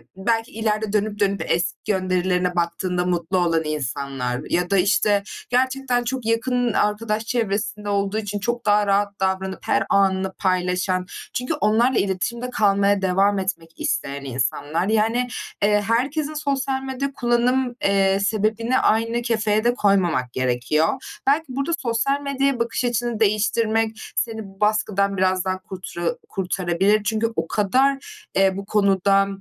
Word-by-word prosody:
belki 225 +4 -1
ileride 215 -1 -1
dönüp 210 0 0
dönüp 200 -3 +1
eski 170 +1 0
gönderilerine 185 -2 0
baktığında 180 +1 -1
mutlu 175 +1 0
olan 170 -2 +2
insanlar 135 -4 -3
ya 180 0 0
da, 200 - +3
işte, 200 +1 +3 0.3
gerçekten 255 0 +1
çok 255 0 -3
yakın 240 +1 +1
arkadaş 215 +1 0
çevresinde 215 -2 -2
olduğu 200 +1 0
için 205 -1 -3
çok 240 +3 -2
daha 210 0 +3
rahat 200 0 +1
davranıp 190 0 -1
her - - +2
anını 190 -1 +2
paylaşan 185 0 0 0.3
çünkü 250 +3 -2
onlarla 240 -2 +2
iletişimde 235 +6 -2
kalmaya 200 -3 +2
devam 195 +2 +2
etmek 165 -4 -5
isteyen 140 0 -2
insanlar. 145 +6 -1
Yani, 225 +3 +1 0.4
eee, 210 0 +4
herkesin 285 +7 0
sosyal 275 -3 -1
medya 270 +1 -3
kullanım, 245 +1 +1
eee, 195 -1 +3
sebebini 215 +4 +1
aynı 230 +2 +1
kefeye 215 -3 +1
de 240 +1 +3
koymamak 180 - +1
gerekiyor. 130 +5 +1 0.4
Belki 295 +4 +3
burada 275 +5 -2
sosyal 260 +3 0
medyaya 275 -2 0
bakış 235 +2 -1
açını 240 -1 -1
değiştirmek 220 +1 +1 0.2
seni 220 -1 -2 0.2
baskıdan 210 -2 +1
biraz 185 0 +1
daha 185 0 -1
kurtura 180 -3 -4 0.2
kurtarabilir. 190 +2 +1
Çünkü 220 +1 0
o - - -1
kadar, 260 +7 +2 0.4
eee, 190 0 +3
bu 200 - -5
konuda, 195 -1 +3
205 Hz, 135 wpm, -22 LUFS, 190-235 Hz, 0.4 s, eee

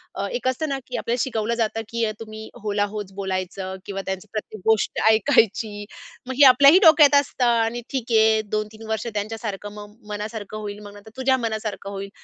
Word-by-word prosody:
अ, 200 - -2
एक 250 +1 -3
असतं 280 +4 -1
ना 275 -1 -2
की 250 - -4
आपल्याला 235 +1 -1
शिकवलं 230 -3 -2
जातं 225 -1 -1
की 230 0 -2
अ, 215 - -1
तुम्ही 220 0 -9
हो 210 - -2
ला 205 0 +2
होच 205 -2 -5
बोलायचं 190 -1 -4
किंवा 195 -1 -4
त्यांचं 190 +2 -5
प्रत्येक 215 -2 -6
गोष्ट 220 -2 +2
ऐकायची 220 -3 +2 0.4
मग 260 - -3
हे 285 - +9
आपल्याही 280 +7 +7
डोक्यात 300 -3 +7
असतं 255 -2 -2
आणि 235 0 +1
ठीक 250 -3 -4
आहे. 220 0 +4
2-3 215 +1 -4
वर्ष 220 +1 -2
त्यांच्यासारखं 210 -1 -4
मग 210 0 -11
मनासारखं 210 0 -5
होईल, 205 -1 -6
मग 205 -1 -11
नंतर 205 +2 -14
तुझ्या 260 0 +2
मनासारखं 220 -4 -4
होईल. 195 0 -6
220 Hz, 190 wpm, -23 LUFS, 205-235 Hz, 0.4 s, हे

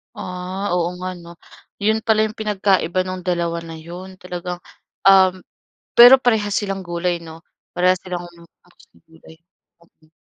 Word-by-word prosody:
Ah, 185 +2 -5
oo 175 0 -1
nga 185 - -3
'no. 170 0 -12 0.5
Yun 215 +2 +2
pala 220 -1 +3
yung 215 - -13
pinagkaiba 195 -4 +1
nung 185 -1 -6
dalawa 170 -2 -1
na 165 - -8
yun. 175 +4 -10
Talagang 180 0 -6 0.5
um, 190 -1 +6 0.6
pero 245 +2 +10
parehas 220 -6 0
silang 195 -2 -2
gulay 175 -1 -2
'no, 165 0 -12 0.3
parehas 180 +1 +3
silang 180 -1 -6 0.8
gulay. 160 0 -18 0.5
Oo. 160 -1 -30
180 Hz, 135 wpm, -20 LUFS, 175-195 Hz, 0.8 s, pero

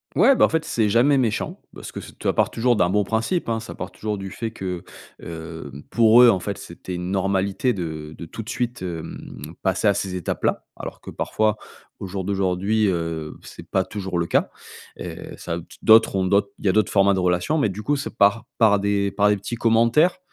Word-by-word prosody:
Ouais, 275 - +6
bah - - +5
en - - +5
fait, 160 0 0
c'est 110 -3 +1
jamais 130 +6 +4
méchant 115 -5 -1 0.2
parce - - -8
que - - -7
c'est - - -11
t - - -12
ça - - +2
part - - +2
toujours 120 0 +2
d'un 90 -2 +2
bon 105 +1 +2
principe, 115 - -1
hein, 115 -1 0
ça 115 - -8
part 90 - -6
toujours 105 -1 -4
du 95 0 -6
fait 115 +3 -4
que, 90 -5 -5 0.4
hem, 80 -4 -8
pour 115 +1 +6
eux, 125 - +9
en 95 - +4
fait, 100 +2 -4
c'était 90 +1 -8
une 90 +1 -4
normalité 100 +4 +1
de 80 -5 -5
de - - -6
tout 115 - -7
de 110 - -8
suite, 125 -2 -3
hem, 85 -3 -7 0.2
passer 95 +2 +1
à 100 - +4
ces 95 -1 -3
étapes-là, 90 -3 -2
alors - - -8
que - - -9
parfois 110 -1 0 0.4
au 100 - -6
jour 95 0 -4
d'aujourd'hui, 100 +2 +1
heu, 80 -3 -3
c'est - - -11
pas - - 0
toujours 95 -3 -4
le 85 - 0
cas. - - +1 0.5
Et - - -6 0.2
ça, 85 -1 -4
t - - -13 0.2
d'autres 110 -1 +6
ont 95 -1 +1
d'autres 100 +1 +2
il - - -6
y - - +5
a - - +4
d'autres 110 +1 +2
formats 100 0 +4
de 95 - 0
relation, 90 - +1
mais 140 -9 +2
du 105 +3 -6
coup, 145 +6 +1
c'est 140 - -5
par 105 +2 +3
par 105 -3 +5
des 100 0 +1
par 105 0 +3
des 105 - +3
petits 120 +4 -5
commentaires 115 +10 +3
100 Hz, 230 wpm, -23 LUFS, 90-115 Hz, 0.5 s, eux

